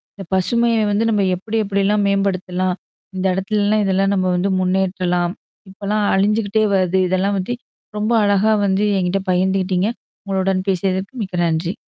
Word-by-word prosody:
இந்த 195 - -8
பசுமையை 230 +4 +2
வந்து 205 +2 +1
நம்ம 210 -2 +1
எப்படி 220 +5 -4
எப்படியெல்லாம் 200 +1 +1
மேம்படுத்தலாம். 185 -2 0 0.4
இந்த 185 - -2
இடத்துலல்லாம் 205 +2 +1
இதெல்லாம் 195 +1 +1
நம்ம 185 -1 0
வந்து 190 +3 0
முன்னேற்றலாம். 180 -1 0 0.4
இப்பல்லாம் 205 +2 -2
அழிஞ்சுகிட்டே 210 +2 +1
வருது. 185 -1 +1
இதெல்லாம் 195 +2 +1
பத்தி 190 +6 -3 0.4
ரொம்ப 215 +3 0
அழகா 205 +2 +3
வந்து 195 +1 +1
என்கிட்ட 185 +1 0
பகிர்ந்துகிட்டீங்க 185 +1 +1 0.4
உங்களுடன் 190 -1 -1
பேசியதற்கு 190 +4 -1
மிக்க 185 -2 -5
நன்றி. 165 +3 -1
195 Hz, 135 wpm, -19 LUFS, 185-205 Hz, 0.4 s, அழகா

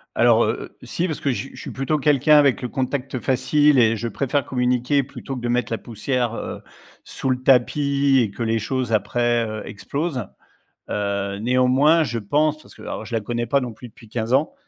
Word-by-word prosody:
Alors - - +5
heu, - - -4
si 175 - -2
parce 155 - -4
que 140 - 0
j 130 +2 -4
je - - -10
suis - - -7
plutôt 135 +3 -1
quelqu'un 150 +1 +4
avec 140 -3 +4
le 125 - -3
contact 130 0 -3
facile 145 +3 +3
et 115 -1 +4
je 115 +2 -3
préfère 140 +4 -1
communiquer 125 +2 +1
plutôt 135 0 -7
que - - -5
de 120 - -3
mettre 120 -1 0
la 115 - -1
poussière, 120 +1 -2
heu, - - -6 0.4
sous 130 - -4
le 130 0 -1
tapis 140 +1 +3
et 110 - -1
que 115 - -6
les 115 0 +1
choses 125 +2 -2
après, 120 +2 +1
heu, 110 0 -5
explosent. 125 - -4 0.6
Heu, 100 -1 -2
néanmoins 130 +7 +3
je 120 -4 -3
pense, 150 +8 0
parce - - -17
que, - - -15
alors - - -5
je 120 - -9
la 115 - +2
connais 120 +2 -3
pas 140 +3 +3
non 125 -3 -5
plus 120 +3 -11
depuis 115 +1 -17
15 115 +1 -3
ans, 140 +4 +2
125 Hz, 210 wpm, -22 LUFS, 115-140 Hz, 0.6 s, Alors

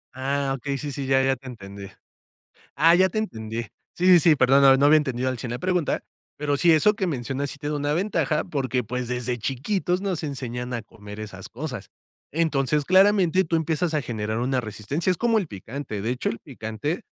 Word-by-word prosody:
Ah, 135 +1 -1
okey, 140 +2 -3
sí, 145 +1 -5
sí, 135 0 -4
ya. 135 0 +3
Ya 135 0 +2
te 130 +1 -14
entendí. 100 -4 -9 0.9
Ah, 165 +2 +6
ya 190 +1 +4
te 215 - -5
entendí. 115 - -3 0.3
Sí, 180 - -2
sí, 180 -2 +8
sí, 160 -2 +5
perdón, 135 +1 +4
no 135 -1 +7
no 140 - +3
había 155 +2 +7
entendido 130 -4 -1
al 130 - -3
100 115 0 -5
la 120 - -4
pregunta. 180 -4 0 0.4
Pero 145 -1 0
sí, 170 +2 +4
eso 185 +7 +5
que 190 -4 -1
mencionas 135 -1 -3
sí - - -9
tiene 150 +1 -3
una 145 0 -1
ventaja, 165 -5 0
porque, 130 -6 -1
pues, 125 +2 -4
desde 125 0 -2
chiquitos 175 - -1
nos 185 -6 -2
enseñan 125 -3 -4
a 115 - -2
comer 105 0 -12
esas 100 -3 -8
cosas. 125 - -6 0.4
Entonces, 150 -2 +1
claramente, 190 -1 +4
tú 165 - 0
empiezas 160 +1 0
a 150 - +1
generar 110 -2 -3
una 130 +1 0
resistencia. 115 - -2
Es 180 - -2
como 235 -2 +2
el 195 - -1
picante, 110 +1 -6
de 115 - -2
hecho, 125 +1 -1
el 115 - -5
picante, 130 - -4
140 Hz, 205 wpm, -24 LUFS, 120-160 Hz, 0.9 s, sí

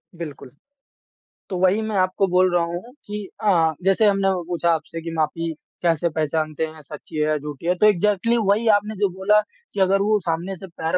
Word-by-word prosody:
बिल्कुल। 150 -5 -8 1.0
तो 185 - -3
वही 190 +4 +3
मैं 220 -1 -3
आपको 185 +1 +2
बोल 180 0 +3
रहा 170 - +3
हूँ 175 +9 -6
कि 210 0 -5 0.2
अ, 165 -6 +3
जैसे 195 +3 +3
हमने 195 -1 +2
वो 180 -2 -3
पूछा 170 0 -1
आपसे 165 +1 -4
कि 165 - -6
माफ़ी 165 +1 -1 0.3
कैसे 170 0 +2
पहचानते 155 0 -1
हैं, 155 0 -11
सच्ची 150 +1 -11
है 150 0 +1
या 155 0 +1
झूठी 150 +1 -8
है? 180 - +2
तो 210 - +3
इग्ज़ैक्टली 210 +4 +2
वही 220 +3 +2
आपने 210 +1 -5
जो 200 0 +1
बोला 190 +3 +3 0.3
कि 200 - -4
अगर 195 +1 +3
वो 210 +1 +3
सामने 175 +2 -3
से 190 +2 -10
पैर 165 +1 -2
180 Hz, 200 wpm, -22 LUFS, 160-200 Hz, 1.0 s, वही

